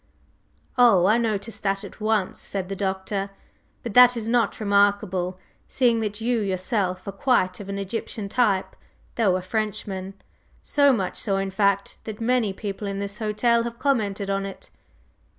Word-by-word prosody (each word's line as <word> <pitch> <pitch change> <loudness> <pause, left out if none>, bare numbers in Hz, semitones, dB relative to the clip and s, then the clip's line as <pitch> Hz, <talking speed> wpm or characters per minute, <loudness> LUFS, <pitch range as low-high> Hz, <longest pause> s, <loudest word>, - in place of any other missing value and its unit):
"Oh, 210 -8 +6
I 215 +4 +4
noticed 220 -1 -2
that 195 -1 -1
at - - -11
once," 215 -3 0
said 190 -2 -4
the 195 - -3
Doctor; 195 +1 -2 0.5
"but 235 - -5
that 245 +1 +7
is 225 -1 -4
not 235 0 +1
remarkable, 200 -3 +1 0.3
seeing 240 -3 +2
that 210 -1 -3
you 235 +1 0
yourself 185 -1 -1
are - - -2
quite 195 -4 +1
of 200 -1 -8
an 200 - -3
Egyptian 200 +1 -4
type, 200 -3 +1 0.4
though 205 -6 +2
a 185 - -2
Frenchman, 195 -2 -3 0.5
so 285 -1 +4
much 195 -8 -1
so, 195 -3 0
in 195 0 -2
fact, 200 0 0
that 215 -1 -6
many 235 -2 +1
people 200 +1 -5
in 195 0 -3
this 200 +1 -5
hotel 230 +2 +2
have 235 0 -5
commented 210 -8 0
on 195 0 -1
it." 195 -1 -9
205 Hz, 165 wpm, -24 LUFS, 195-225 Hz, 0.5 s, that